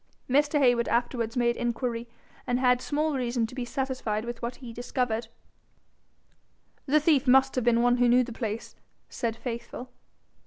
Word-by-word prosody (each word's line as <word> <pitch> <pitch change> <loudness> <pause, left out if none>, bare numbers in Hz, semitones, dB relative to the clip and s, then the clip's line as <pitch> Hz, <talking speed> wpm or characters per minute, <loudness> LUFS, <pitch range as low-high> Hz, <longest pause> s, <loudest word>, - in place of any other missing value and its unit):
Mr. 290 +3 +3
Heywood 245 -4 +3
afterwards 235 0 -1
made 235 -1 +2
inquiry, 240 -1 -2 0.4
and 245 0 +1
had 250 -1 +3
small 305 +2 0
reason 245 -3 0
to 225 - -9
be 250 -1 -4
satisfied 240 -4 -2
with 240 0 -6
what 240 +1 -3
he 245 -4 -10
discovered. 240 -1 -2 1.6
'The 300 +3 +4
thief 295 -3 +2
must 265 +1 +5
have 255 - 0
been 235 0 +4
one 245 0 +4
who 245 0 +4
knew 250 +1 +5
the 240 -1 -7
place,' 225 -1 -5 0.3
said 230 -2 -2
Faithful. 235 +1 -6
245 Hz, 160 wpm, -27 LUFS, 235-260 Hz, 1.6 s, must